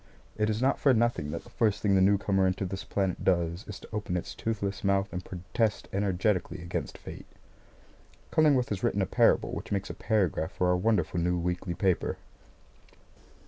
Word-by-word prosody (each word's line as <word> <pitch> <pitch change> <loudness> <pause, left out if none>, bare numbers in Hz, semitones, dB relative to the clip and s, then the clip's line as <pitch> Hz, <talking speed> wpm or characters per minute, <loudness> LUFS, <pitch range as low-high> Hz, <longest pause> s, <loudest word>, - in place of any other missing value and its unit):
It 105 0 +1
is 110 +3 -1
not 135 - +2
for 135 -3 +4
nothing 115 -10 +1
that 85 - -5
the 120 - -16
first 110 -4 +1
thing 100 -2 +3
the 95 - +4
newcomer 95 0 +3
into 95 +2 -1
this 95 +1 -5
planet 95 -2 -1
does 85 +1 +1
is 105 - -7
to - - -13
open 100 -4 -2
its 85 - -5
toothless 100 -3 -3
mouth 100 0 +1
and 90 +1 -4
protest 95 +5 -2
energetically 95 -1 0
against 85 - -4
fate. - - -10 1.0
Cullingworth 145 -6 +4
has 100 -3 -3
written - - +1
a - - +1
parable - - +3
which - - -6
makes 100 -1 -1
a - - -6
paragraph 95 -5 0
for 90 - +1
our 90 - +4
wonderful 90 -3 +1
new 90 +1 +1
weekly 90 +1 -2
paper. 95 -2 0
95 Hz, 185 wpm, -29 LUFS, 90-105 Hz, 1.0 s, for